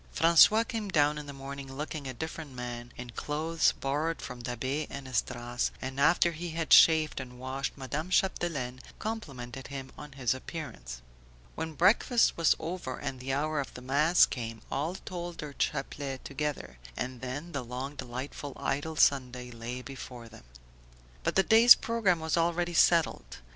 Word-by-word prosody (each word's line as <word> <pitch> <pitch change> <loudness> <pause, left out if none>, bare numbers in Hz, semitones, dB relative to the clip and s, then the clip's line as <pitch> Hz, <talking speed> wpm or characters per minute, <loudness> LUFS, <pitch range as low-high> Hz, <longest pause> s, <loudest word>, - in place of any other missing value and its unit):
François 170 +8 +6
came 220 -3 -3
down 150 -3 +3
in 150 - -8
the - - -6
morning 135 0 -8
looking 145 +1 -5
a 130 - -4
different 160 +1 -6
man, 120 -1 -6
in 125 -1 -7
clothes 160 +6 +1
borrowed 150 +4 -2
from 125 -1 -7
Da'Be 130 +5 -2
and 140 -1 -7
Esdras, 120 0 -1
and 130 +1 -5
after 170 +4 +4
he 170 +2 -5
had 165 0 +1
shaved 160 -3 +6
and 125 -1 -8
washed 130 +2 -4
Madame 145 +6 -4
Chapdelaine 155 -10 0 0.2
complimented 135 - -6
him 135 -1 -7
on 150 -2 -10
his 130 -3 0
appearance. 95 - -7 0.5
When 160 -1 -5
breakfast 225 - +4
was 165 -1 +4
over 165 -7 -5
and 135 -2 -5
the 130 +1 -4
hour 150 +2 0
of 140 - -5
the 125 - -9
mass 150 +7 +5
come, 115 -3 -6
all 155 +6 -1
told 175 -3 -6
their 150 -2 -6
chaplet 135 0 -3
together; 140 - -4 0.2
and 125 -1 -4
then 145 +7 -5
the 140 -4 -3
long 125 +4 -5
delightful 130 +2 -6
idle 150 +4 -2
Sunday 125 -4 +2
lay 120 +2 -6
before 125 -3 -9
them. 85 - -15 0.8
But - - -1
the 190 - +5
day's 230 +4 +9
programme 220 -7 +1
was 160 +1 0
already 175 +1 +1
settled. 160 - +3
140 Hz, 165 wpm, -30 LUFS, 125-165 Hz, 0.8 s, day's